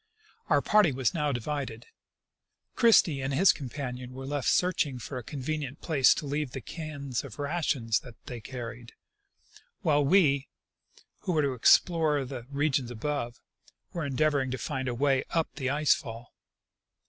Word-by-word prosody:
Our - - +3
party 210 -7 +4
was 130 -2 0
now 150 -3 0
divided; 125 -2 -4 0.9
Christie 175 - +5
and 135 +1 -2
his 185 +7 +6
companion 125 -2 -6
were 135 +1 -7
left 145 -1 -2
searching 170 -7 +1
for, 125 +2 -6
a - - -9
convenient 145 +1 -4
place 145 -6 +4
to 150 - -4
leave 145 -2 -2
the 135 - -4
cans 140 -4 -5
of 130 -6 -10
rations 145 -7 0 0.2
they 120 -2 -7
carried, 120 0 -8 0.9
while 145 -4 +3
we, 140 -4 +3 0.7
who 180 - -2
were 155 -2 +2
to 140 -2 0
explore 150 +3 +4
the 125 -2 -7
regions 140 -3 0
above, 120 0 -3 0.5
were 170 - -3
endeavoring 140 -1 +1
to 130 - -3
find 135 -3 -3
a 125 - -2
way 135 +1 +2
up 165 -1 0
the 130 -3 -2
ice 150 +2 +4
fall. 120 -6 -8
140 Hz, 150 wpm, -28 LUFS, 125-150 Hz, 0.9 s, his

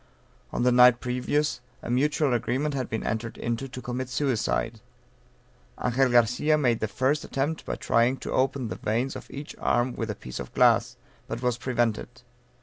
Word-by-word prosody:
On - - -1
the 125 - +4
night 125 0 +7
previous, 125 +3 -1 0.2
a - - -4
mutual 145 +2 +2
agreement 130 +5 0
had 130 -3 -3
been 110 - -3
entered 110 +1 -3
into 120 +3 -3
to 125 -1 -9
commit 125 +1 -4
suicide. 120 -4 -1 1.0
Angel 125 +2 +3
Garcia 125 +6 +3
made 120 -6 +2
the 110 - -1
first 130 +8 0
attempt 145 +4 -2
by - - -2
trying 120 +3 +2
to - - -6
open 130 -2 0
the - - -5
veins 120 +5 -1
of - - -9
each 145 +2 -8
arm 120 +1 +1
with 115 -1 -3
a 105 - -2
piece 65 - -8
of - - -7
glass; - - +4 0.3
but 115 +2 -5
was 125 -1 0
prevented. 120 -1 -1
125 Hz, 175 wpm, -26 LUFS, 120-135 Hz, 1.0 s, night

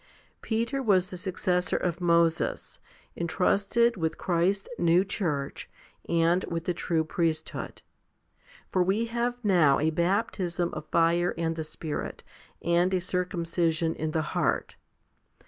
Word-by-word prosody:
Peter 235 +4 -1
was 190 -6 +2
the - - -5
suc 185 0 -4
cessor 180 -2 +1
of 175 0 -2
Moses, 170 -1 +1 0.4
entrusted 200 +7 +1
with 160 -2 -1
Christ's 185 +2 0
new 175 +2 +4
church 150 -9 -3 0.4
and 170 +2 +3
with 165 -1 -4
the 180 - 0
true 165 -1 0
priesthood; 160 0 -3 0.9
for 185 - +2
we 195 +6 +1
have 240 +1 -1
now 170 -9 +5
a 160 +2 +1
baptism 175 0 0
of 155 0 -6
fire 170 +1 +2
and 165 -1 -1
the 160 - -3
Spirit, 155 0 -5 0.4
and 175 +2 +2
a - - +2
circumcision 170 -3 -1
in 155 - -3
the 155 0 0
heart. - - 0
175 Hz, 130 wpm, -28 LUFS, 165-190 Hz, 0.9 s, now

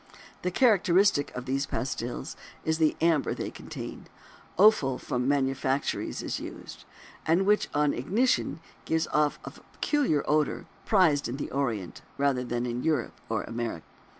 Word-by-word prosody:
The 180 - 0
characteristic 195 - +4
of 125 0 -5
these 135 +1 -1
pastils 125 -2 -4 0.3
is 160 0 +1
the 155 -1 +3
amber 165 -3 +2
they - - -4
contain - - -8 0.5
(the 185 - +5
offal 140 -12 +5
from 125 +1 -2
manufactories 135 -1 0
is - - -3
used) - - -9 0.4
and 170 +4 +3
which 210 +1 +3
on 150 0 +3
ignition 210 - 0 0.2
gives 160 0 +1
off 150 -1 +2
a - - -6
peculiar 270 - -1
odor 150 -1 +1
much - - -16 0.2
prized 170 -9 +4
in 125 - -4
the - - -5
Orient, 115 -10 -2 0.2
rather 140 -3 +1
than 120 0 -2
in 120 0 -3
Europe 150 -6 -1
or - - -1
America. 115 -8 -4
145 Hz, 150 wpm, -28 LUFS, 130-170 Hz, 0.5 s, the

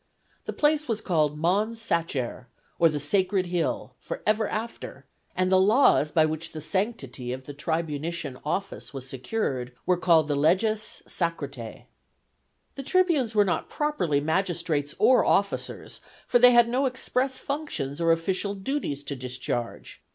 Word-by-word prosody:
The - - -3
place 300 0 +2
was 225 -3 -1
called 155 -7 +1
Mons 205 +8 +1
Sacer, 150 - -2 0.3
or 165 - +6
the 150 -1 -2
Sacred 185 +5 +1
Hill, 175 -2 -2
forever 220 - -1
after, 225 +2 -6 0.3
and 185 0 +1
the 190 - +6
laws 205 - +4
by 160 -1 +4
which 155 +1 -4
the 155 - -5
sanctity 150 - -2
of 130 +1 -5
the 145 - -8
tribunitian 155 -1 -3
office 155 -1 -4
was 130 -1 -6
secured 130 - -3
were 180 - +3
called 165 -3 +4
the 145 - 0
Leges 195 +9 +1
Sacratæ. 140 - -4 0.9
The 275 - -6
tribunes 300 - +2
were 205 -1 +5
not 180 - -1
properly 240 - 0
magistrates 160 -2 -1
or 255 - +5
officers, 200 0 0 0.2
for 245 - +3
they 250 +1 +8
had 240 -1 +6
no 260 +3 +1
express 260 +1 -1
functions 170 - -4
or 165 0 +4
official 185 +4 0
duties 195 - -3
to 140 - -5
discharge. 125 -2 -5
170 Hz, 145 wpm, -26 LUFS, 145-225 Hz, 0.9 s, they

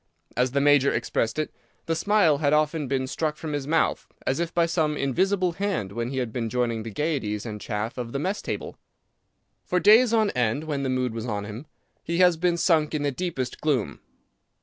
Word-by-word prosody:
As 125 +1 +2
the 140 - +2
major 145 -1 +5
expressed 115 +3 -1
it, 155 - -2 0.3
the 165 - 0
smile 185 -6 +3
had 145 -1 +2
often 150 -1 +1
been 130 0 0
struck 150 +3 -2
from 155 -2 -5
his 145 -2 -3
mouth, 165 +2 +1 0.2
as 135 - 0
if 170 -1 -1
by 170 -1 +2
some 160 -3 0
invisible 185 +7 +1
hand, 185 - -2
when 115 +3 -3
he 135 - -4
has 125 -3 -1
been 115 0 -3
joining 120 -2 -1
the 115 - -6
gayeties 110 -5 -2
and 105 -2 -6
chaff 110 +3 -3
of 120 -1 -4
the 140 - -2
mess 190 +8 -2
table. - - -5 0.8
For 180 - 0
days 220 +5 +6
on 220 -3 +3
end, 125 +3 0
when 150 -3 -2
the 135 - -1
mood 130 -2 0
was 115 +1 -5
on 105 -3 -3
him, 110 +8 -8 0.4
he 170 - -2
has 180 -1 +5
been 175 +1 +1
sunk 160 -3 +2
in 145 - -1
the 145 - +1
deepest 135 -4 -4
gloom. 140 -8 0
145 Hz, 210 wpm, -25 LUFS, 125-165 Hz, 0.8 s, days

